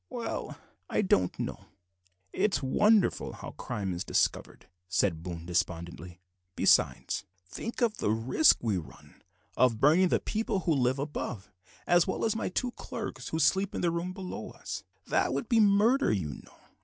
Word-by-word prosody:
"Well, 245 -2 -5 0.3
I - - +1
don't 90 - +2
know. - - -5 0.7
It's 200 -6 +1
wonderful 210 +9 +3
how - - -8
crime 95 -3 -4
is 85 - -3
discovered," - - -1 0.2
said 95 -3 +1
Boone 85 -1 -6
despondingly; 85 0 -3 0.3
"besides, - - +2 0.2
think 230 - -6
of 225 -2 +1
the - - -1
risk 115 - +4
we 110 -5 +1
run 85 - -11 0.3
of 120 -4 +3
burning 160 +8 +5
the - - +2
people 215 -3 -2
who 165 - +1
live 130 -1 +1
above, 135 -7 -5 0.3
as 175 -1 +4
well 190 - -1
as 220 - +1
my 225 - -2
two 245 +7 -1
clerks 205 - -6
who 160 - -2
sleep 190 +6 +2
in - - -2
the 170 - +2
room 170 +2 -3
below 185 -1 -6
us; - - -7 0.2
that - - +1
would - - -2
be 235 -3 +3
murder, 215 +6 +4
you 90 -8 -1
know. 70 - -11
155 Hz, 165 wpm, -29 LUFS, -, 0.7 s, burning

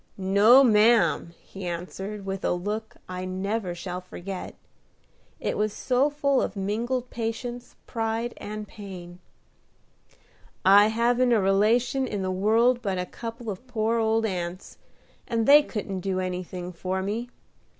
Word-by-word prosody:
"No, 200 +7 +6
ma'am!" 210 -7 +4
he 195 -2 -8
answered, 190 +4 -5
with 195 0 -4
a - - +1
look 210 +5 -4
I 185 0 -5
never 190 +1 -2
shall 180 +1 -5
forget, 185 +1 -7 0.8
it - - -2
was 210 0 0
so 260 +3 +1
full 285 -2 +1
of - - -3
mingled 235 +6 -2
patience, 240 +1 -5
pride, 225 +1 -2
and 210 0 -6
pain. 180 -4 -10 1.5
"I 200 +2 +8
haven't 240 +2 +2
a 225 - +4
relation 225 +7 +2
in 200 -2 -3
the 185 - -1
world 225 +6 +3
but 195 -4 -2
a 180 - -2
couple 230 +2 -6
of 200 +7 -9
poor 230 -1 0
old 225 0 +2
aunts, 180 -2 -5 0.5
and 230 -3 0
they 290 +4 +8
couldn't 205 -8 -4
do 185 0 -2
anything 180 -1 -4
for 185 +2 -3
me. 225 +5 -3
210 Hz, 140 wpm, -26 LUFS, 185-235 Hz, 1.5 s, I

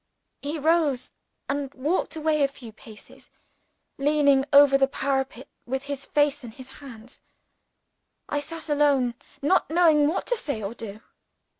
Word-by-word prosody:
He 295 +3 -4
rose, 305 -4 +1 0.3
and 280 -1 -3
walked 305 +6 -1
away 310 -1 0
a 280 - +4
few 255 -4 -12
paces, 215 0 -15 0.7
leaning 280 -1 +3
over 280 -1 +7
the 270 0 +4
parapet 270 -1 -2 0.2
with 265 +2 -3
his 280 -1 -6
face 290 -1 +1
in 240 - -7
his 255 +3 -12
hands. 245 -3 -12 1.1
I 290 - -1
sat 325 +3 -8
alone, 285 -5 +2 0.3
not 370 +6 +2
knowing 315 -3 +4
what 320 - -1
to - - 0
say 265 - -4
or 200 +3 -4
do. 220 -2 -9
280 Hz, 145 wpm, -25 LUFS, 260-300 Hz, 1.1 s, over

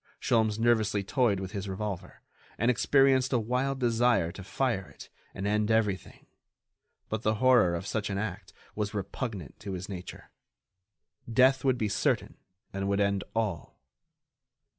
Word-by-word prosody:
Sholmes 110 -2 +2
nervously 110 -3 +2
toyed 110 -2 +1
with 95 -1 -5
his 100 -2 -5
revolver, 95 -2 -5 0.3
and 120 +3 +3
experienced 135 +1 +3
a - - +4
wild 125 +4 -1
desire 120 -7 +2
to 95 +1 -9
fire 100 - -1
it 70 - -13 0.3
and 95 - -4
end 105 +1 +1
everything; 105 -5 0 0.8
but 110 0 -3
the 110 -1 +1
horror 115 -7 +4
of 85 - -5
such 105 0 -2
an 100 - -2
act 100 -1 -4 0.2
was 105 0 -3
repugnant 100 - -5
to 100 -2 -6
his 95 +1 -5
nature. 90 -3 -9 1.0
Death 130 +3 +4
would 130 -2 +2
be 110 - 0
certain 100 - 0 0.4
and 95 0 -2
would 100 0 +1
end 100 -1 +1
all. 105 -7 -2
105 Hz, 150 wpm, -29 LUFS, 100-120 Hz, 1.0 s, a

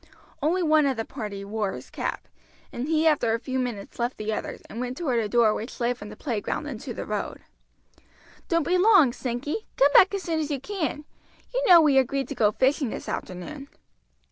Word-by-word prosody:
One 305 - +1
only 305 -3 +4
of 265 - -2
the 225 - -2
party 210 -6 -6
wore 205 -1 -2
his - - -10
cap, - - -4 0.5
and 245 +3 -3
he 315 0 +2
after 275 -8 +3
a - - -3
few 260 +1 -3
minutes 240 -5 -5
left 240 +2 -1
the 215 +1 -2
others, - - -5
and 225 - -8
went 250 +1 -4
toward 260 -9 0
a 215 -2 -2
door 230 -1 +4
which 225 +4 -6
led 245 +1 +1
from 210 -3 -10
the 210 - -9
playground 235 +3 -3
into 265 -2 -6
the - - -5
road. 210 -1 -4 1.1
"Don't 335 -2 +2
be 360 +1 +3
long, 365 - +6
Sankey; 265 - -4
come 285 +1 +5
back 385 +5 +7
as 390 - -4
soon 325 -2 -1
as 305 -1 -2
you 285 -2 -2
can, 310 -3 -3 0.5
you - - 0
know 345 -2 +9
we 285 -4 +5
agreed 270 +1 0
to - - -3
go 215 -5 +3
fishing 265 +3 +1
this - - -6
afternoon." 275 +10 -6
260 Hz, 210 wpm, -26 LUFS, 225-305 Hz, 1.1 s, know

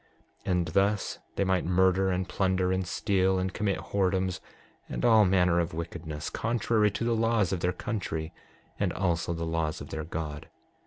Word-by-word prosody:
6:23 - - +1
And 90 -2 +1
thus 100 +4 +1 0.2
they - - +1
might 95 -1 +1
murder, 95 +2 +3
and 90 0 -1
plunder, 95 0 +1
and 95 -1 -1
steal, 95 +1 +1
and 95 0 -1
commit 105 -3 0
whoredoms 95 -1 0 0.5
and - - -2
all 110 -3 +6
manner 90 -2 +3
of 85 -2 -2
wickedness, 80 -2 -5
contrary 115 -2 +1
to 105 +3 -4
the 120 0 +1
laws 115 -4 +2
of 95 - -1
their 90 +1 +1
country 90 -5 -4 0.5
and - - +1
also 85 -2 0
the 85 0 -2
laws 80 -1 -1
of - - -9
their 80 - -3
God. 80 -1 -5
95 Hz, 175 wpm, -28 LUFS, 85-100 Hz, 0.5 s, all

